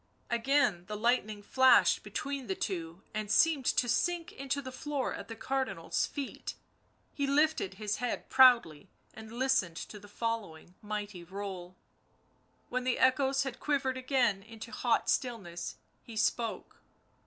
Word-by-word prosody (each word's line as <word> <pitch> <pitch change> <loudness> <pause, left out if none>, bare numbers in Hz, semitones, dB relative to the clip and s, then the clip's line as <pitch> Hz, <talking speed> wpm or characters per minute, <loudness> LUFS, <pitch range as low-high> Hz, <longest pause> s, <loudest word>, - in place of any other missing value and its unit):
Again 235 -7 +2
the 210 0 -4
lightning 215 -2 +1
flashed 260 +4 +5
between 275 -3 -4
the 190 - -1
two, 170 -2 -4
and 215 -1 -3
seemed 280 +4 +4
to 245 - +2
sink 335 +8 0
into 275 +1 -3
the 260 -2 -6
floor 275 0 -3
at - - -7
the 225 - -7
Cardinal's 225 -8 -1
feet. 280 -2 -6 0.6
He 280 -1 -1
lifted 310 +7 +2
his 215 -1 -2
head 245 -1 -3
proudly 240 - +5 0.2
and 220 0 -10
listened 240 -9 +1
to 210 - -7
the 205 - -14
following 205 -7 -4
mighty 210 -4 -5
roll; 185 -1 -7 0.9
when 250 0 -1
the 255 -1 +1
echoes 270 +1 +3
had 260 -2 -5
quivered 275 -3 0
again 255 -6 +1
into 225 +1 -10
hot - - +1
stillness 195 -9 -2 0.3
he 225 -2 -10
spoke. 225 0 -1
235 Hz, 140 wpm, -31 LUFS, 205-265 Hz, 0.9 s, flashed